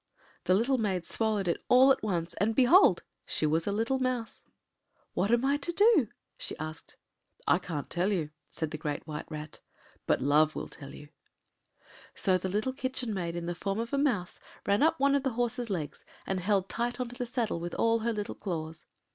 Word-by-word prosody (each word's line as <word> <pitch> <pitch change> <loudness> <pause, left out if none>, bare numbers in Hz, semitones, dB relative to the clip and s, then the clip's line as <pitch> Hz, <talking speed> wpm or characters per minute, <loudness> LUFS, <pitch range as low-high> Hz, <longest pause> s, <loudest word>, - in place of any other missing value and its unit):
” - - -31
The 185 - +4
little 250 +5 +2
maid 190 -5 -1
swallowed 215 -4 -1
it 170 - +1
at 260 +1 +6
once, 175 -5 -1
and, 220 +2 +2
behold! 270 +10 +6 0.2
she - - -1
was 160 +3 +1
a - - +1
little 230 +6 0
mouse. 255 -3 -2 0.7
“What 195 - 0
am 240 +2 +3
I 280 +1 +3
to 290 +4 -1
do?” 400 - +5 0.3
she - - -5
asked. 155 +1 -7 0.5
“I 150 +5 +4
can’t 160 -6 -5
tell 180 +4 +1
you,” 160 -6 -1 0.2
said 160 0 -3
the 155 - -5
Great 150 -1 -3
White 150 -1 -6
Rat, 155 0 -7 0.5
“but - - +3
Love 150 +3 +3
will - - -4
tell 140 -2 -11
you.” 145 - -12 1.1
So 185 -2 +2
the 190 - -3
little 215 +7 -1
Kitchen 255 -3 -3
Maid, 170 -3 -3
in 170 -1 -4
the 175 - -2
form 195 +4 -3
of 230 +1 -3
the 280 - +1
mouse, 230 -12 0 0.3
ran 200 +1 +2
up 320 +2 +3
one 280 +1 +4
of 280 - +3
the 265 -2 -1
horse’s 240 0 -1
legs, 160 -7 -4 0.2
and 190 -1 -1
held 195 +1 +1
tight 240 +4 -2
on 250 - -1
to 245 - -10
the 245 -1 -4
saddle 235 -7 -1
with 175 0 -5
all 230 0 +2
her 230 +1 0
little 210 -2 -3
claws. 165 -5 -5
205 Hz, 205 wpm, -30 LUFS, 170-245 Hz, 1.1 s, at